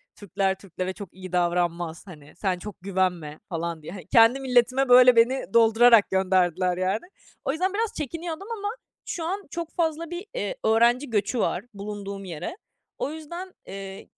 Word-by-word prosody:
Türkler 195 -1 -1
Türklere 185 -1 -5
çok 200 -3 -10
iyi 185 -1 -10
davranmaz, 175 -2 0
hani 150 -5 -13
sen 185 -1 -1
çok 210 0 -8
güvenme." 180 -5 -1
falan 170 -2 -3
diye. 155 - -8
Hani, 185 -4 -9
kendi 230 +5 +5
milletime 255 0 +2
böyle 250 0 +8
beni 245 +4 +3
doldurarak 230 -1 +6
gönderdiler, 185 -1 +2
yani. 190 - -1 0.4
O 270 - +1
yüzden 370 +6 -1
biraz 445 +1 -1
çekiniyordum 330 - -5
ama 410 0 -3 0.4
şu 335 - -4
an 390 +3 -3
çok 335 -1 -5
fazla 330 -1 -1
bir, 350 +4 -6
eee, - - -3
öğrenci 240 +4 +3
göçü 225 +3 0
var 195 -2 0
bulunduğum 200 -1 -6
yere. 175 - -6 0.4
O 285 - -2
yüzden, 340 +4 -8
eee, 195 0 -8
210 Hz, 160 wpm, -25 LUFS, 185-280 Hz, 0.4 s, böyle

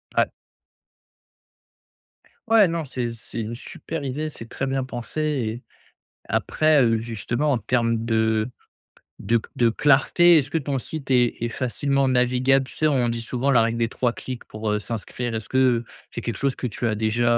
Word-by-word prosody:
Ouais. - - +4 2.2
Ouais, 215 -5 +6
non, 165 -2 -2
c'est 125 -2 -3
c'est 115 0 -7
une 115 +2 -4
super 150 +4 -7
idée, 150 +4 -3
c'est 115 -6 -10
très 135 - -3
bien 135 -1 -1
pensé, 125 +4 -5
et 125 -6 -2 0.6
après, 155 -2 +3
heu, 115 -2 +3
justement, 120 +5 -2
en 130 - +1
termes 115 0 0
de 110 0 +1 0.7
de 115 -1 +1 0.2
de 120 - +4
clarté. 150 +7 +5
Est-ce 145 -1 +1
que 165 - 0
ton 140 -2 -2
site 140 +1 -6
est 120 -2 +2
est 120 - 0
facilement 140 +3 0
navigable? 130 +1 +3
Tu - - -12
sais, 155 - +3
on 130 -5 +2
dit 115 0 -2
souvent 125 +4 -1
la 120 -4 +5
règle 115 +1 0
des 115 -1 +1
3 120 0 0
clics 125 -1 -7
pour, 110 0 -4
heu, 105 - +1
s'inscrire? 115 +2 -4
Est-ce 110 0 -5
que 130 -3 +3 0.3
c'est 120 - -5
quelque 115 -2 -3
chose 140 -2 0
que - - -5
tu 120 0 -2
as 110 - 0
déjà, 120 +2 +2
125 Hz, 180 wpm, -24 LUFS, 115-135 Hz, 2.2 s, Ouais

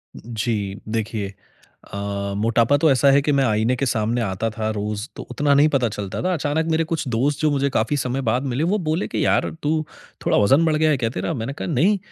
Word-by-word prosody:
जी। 110 -3 -3
देखिए, 110 -2 -2 0.7
अ, 100 0 -3
मोटापा 115 +5 +3
तो 155 +2 +3
ऐसा 135 +1 +4
है 140 +1 +5
कि 145 +1 0
मैं 140 -1 +3
आईने 110 +2 +1
के 135 - -1
सामने 115 -1 0
आता 105 +1 -1
था 110 0 -3
रोज़ 105 +2 -3
तो - - -7
उतना 145 -1 +2
नहीं 145 +2 +5
पता 130 -5 +1
चलता 100 -2 -5
था। 185 0 +1
अचानक 160 0 0
मेरे 160 +1 +2
कुछ 160 -4 -1
दोस्त 135 +5 0
जो 155 -1 +3
मुझे 140 0 +1
काफ़ी 135 +2 0
समय 130 0 -2
बाद 125 +3 0
मिले, 135 +2 -1
वो 190 +5 +1
बोले 160 +5 0
कि - - -1
यार - - +2
तू 155 +1 0 0.4
थोड़ा - - +3
वज़न 135 +11 +4
बढ़ 155 - +2
गया 155 +1 +3
है 145 - +2
क्या 115 -3 -1
तेरा? 165 - -3
मैंने 130 0 -4
कहा - - -5
नहीं। 175 +8 +2
130 Hz, 230 wpm, -22 LUFS, 110-145 Hz, 0.7 s, है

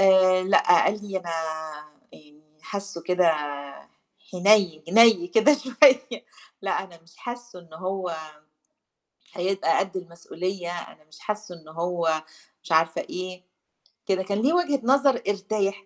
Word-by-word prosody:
آآ 185 -1 +5
لأ، 190 -2 +4
قال 210 +1 -2
لي 190 - -1
"أنا 175 -2 -7 0.8
يعني 150 0 -19 0.2
حاسّه 200 -4 -6
كده 180 -1 +2 1.1
حنيّن 185 -4 +3
نَي 220 -2 +6
كده 225 +11 +5
شوية 265 -1 +3 0.4
لأ، - - -1
أنا 170 -3 -17
مش 165 0 -23
حاسّه 240 -4 -9
إن 165 -2 -18
هو 185 -1 -4 1.2
هيبقى 180 -2 0
قد 195 -1 -2
المسئولية،" 175 +1 -6
أنا 155 - -12
مش 155 0 -17
حاسّه 210 -3 -5
إنه 155 -2 -15
هو 165 -2 -1 0.4
مش - - -7
عارفة 160 0 +2
إيه، 185 0 -7 0.6
كده 190 -1 0
كان 200 +2 -2
لي 280 +6 +2
وجهة 300 -6 +1
نظر 270 0 +3
أرتاح 200 0 -2
190 Hz, 130 wpm, -24 LUFS, 170-210 Hz, 1.2 s, نَي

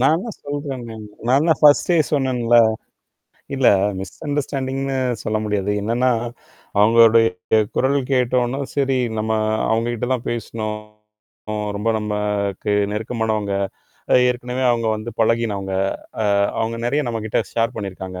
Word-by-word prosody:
நான் 135 +5 +4
என்ன 215 +7 -5
சொல்றேன்ங்கன்னா 135 -5 -5 0.3
நான் 135 +5 +4
தான் 160 - +3
பர்ஸ்டே 150 +4 +5 0.2
சொன்னேங்களா? 125 -4 +3 0.9
இல்ல 135 -2 +2 0.3
மிஸ் 95 -2 -8
அண்டர்ஸ்டாண்டிங்ன்னு 135 -2 -2 0.3
சொல்ல 110 0 -1
முடியாது. 105 -2 -1
என்னன்னா 120 +4 +1 0.7
அவங்களுடையே 115 -3 +4 0.2
குரல் 135 +2 +2
கேட்ட 125 -1 +1
உடனே 120 +3 -2 0.2
சரி 135 -2 +2 0.2
நம்ம 110 +1 -1 0.4
அவங்கிட்டலாம் 120 +2 -1
பேசனோம். 110 -2 -4 1.0
ரொம்ப 105 +3 -2
நமக்கு 105 -1 -2 0.2
நெருக்கமானவங்க. 110 -2 -2 0.7
ஏற்கனவே 125 +1 -2
அவங்க 115 -1 0
வந்து 110 +2 -6
பழகினவங்க. 110 -4 0 0.5
அ, - - 0 0.3
அவங்க 115 +1 -1
நெறைய 140 +5 +1
நம்மகிட்ட 110 -2 -2
ஷேர் 115 +1 0
பண்ணியிருக்காங்க. 95 -3 -6
115 Hz, 110 wpm, -21 LUFS, 110-130 Hz, 1.0 s, பர்ஸ்டே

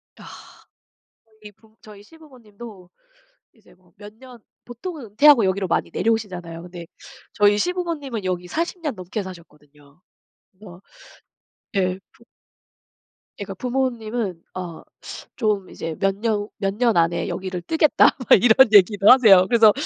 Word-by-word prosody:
아. - - -16 1.2
저희 210 -1 -13
부모 220 +2 -27
저희 210 -2 -14
시부모님도 230 - -15 0.6
이제 205 -5 -24
뭐 180 -1 -30
몇 205 +1 -13
년 250 +1 -15 0.3
보통은 280 +5 -8
은퇴하고 235 +3 +5
여기로 190 0 -1
많이 170 - -1
내려오시잖아요. 180 -7 -3
근데 175 -1 -11 0.5
저희 205 0 +3
시부모님은 310 - -4
여기 180 -1 -4
40 340 - -4
년 300 -6 -4
넘게 185 +2 -6
사셨거든요. 150 -5 -16 0.5
그래서 185 -2 -15 0.9
예 185 -1 0
부 235 - -26 1.2
예 - - -4
그러니까 195 - -7
부모님은 235 -6 -3
어 175 -3 -7 0.6
좀 210 -5 -1
이제 165 -1 -7
몇 195 -1 +1
년 210 -1 -2
"몇 195 -1 -2
년 230 -3 +1
안에 170 0 0
여기를 185 -2 -5
뜨겠다." 315 - +3 0.2
막 195 - +6
이런 245 +3 +6
얘기도 200 0 +5
하세요. 215 -8 +7
그래서 225 -3 +5
205 Hz, 295 characters per minute, -21 LUFS, 185-240 Hz, 1.2 s, 하세요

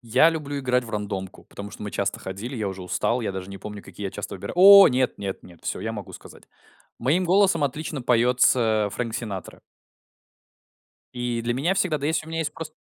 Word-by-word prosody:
Я 130 +7 +4
люблю 145 -3 -4
играть 125 -1 +1
в 115 - -10
рандомку, 100 -3 -5
потому 100 0 -9
что - - -10
мы 105 - -5
часто 100 0 -2
ходили, 100 +8 -6
я 105 -3 -2
уже 95 -1 -7
устал, 115 +6 -1
я 110 -4 -3
даже 95 0 -6
не 95 - -8
помню, 105 -1 -8
какие 100 - -7
я - - -4
часто - - -6
выбира 90 - -6
О 195 +2 +10
нет 125 0 0
нет 100 -1 -5
нет, 85 -2 -16
всё, - - -3
я - - -3
могу - - -8
сказать. - - -13 0.5
Моим 155 +10 +1
голосом 185 -3 +3
отлично 145 +1 -4
поется 120 -3 +3
Фрэнк 115 -2 -3
Синатра. 105 -6 -6 1.5
И 120 -1 -2
для 120 +1 -1
меня 165 +9 +1
всегда, 180 -5 0
да, 140 - -3
есть, 160 0 0
у - - -12
меня 165 0 -4
есть 150 -2 -3
просто 155 -1 -8
120 Hz, 210 wpm, -24 LUFS, 105-150 Hz, 1.5 s, О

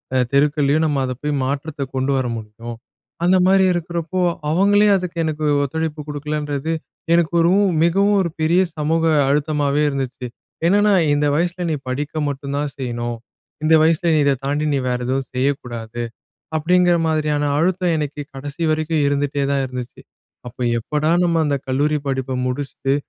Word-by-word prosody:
அ - - +3
தெருக்கள்லயோ 145 +1 +2
நம்ம 145 -3 0
அத 130 - -3
போய் 150 0 0
மாற்றத்த 140 +2 -3
கொண்டு 130 +1 0
வர 130 - 0
முடியும். 115 +2 -8 0.5
அந்தமாரி 185 +2 +4
இருக்கிறப்போ, 170 +1 -2 0.3
அவுங்களே 205 +5 +4
அதுக்கு 180 -2 -6
எனக்கு 155 -1 -2 0.2
ஒத்துழைப்பு 160 +2 -3
கொடுக்கலன்றது 150 0 -3 0.4
எனக்கு 170 -1 +2
ஒரு 170 +1 +4 0.3
மிகவும் 200 +4 +3
ஒரு 175 - -1
பெரிய 170 +4 +3 0.2
சமூக 160 +2 0 0.2
அழுத்தமாவே 145 0 +1
இருந்துச்சு. 135 -2 -4 0.4
ஏன்னா 195 +4 +4
நான் 185 -5 +4
இந்த 145 0 +1
வயசில 175 +2 -1
நீ - - +1
படிக்க 145 +3 -3
மட்டும் 140 0 -4
தான் 145 0 -2
செய்யணும். 120 -2 -3 0.5
இந்த 155 +1 +3
வயசில 165 +1 +2
நீ - - +3
இத 140 - +4
தாண்டி 145 +2 0
நீ 140 - +1
வேற 125 - 0
எதுவும் 135 0 -1
செய்யக்கூடாது, 120 -3 -3 0.6
அப்பிடிங்கிற 175 +2 +3
மாதிரியான 150 -2 0 0.2
அழுத்தம் 180 +1 +1
எனக்கு 150 -1 -3
கடைசி 145 +4 -6
வரைக்கும் 155 0 0
இருந்துட்டே 140 0 0
தான் 140 -1 +1
இருந்துச்சு. 125 -1 -7 0.5
அப்போ 125 +1 -8 0.2
எப்படா, 150 +5 -1
நம்ம 170 -1 +2
அந்த 145 -1 +1
கல்லூரி 145 +3 +1
படிப்ப 130 -1 -2
முடிச்சிட்டு 135 +1 -2
150 Hz, 150 wpm, -20 LUFS, 135-165 Hz, 0.6 s, அந்தமாரி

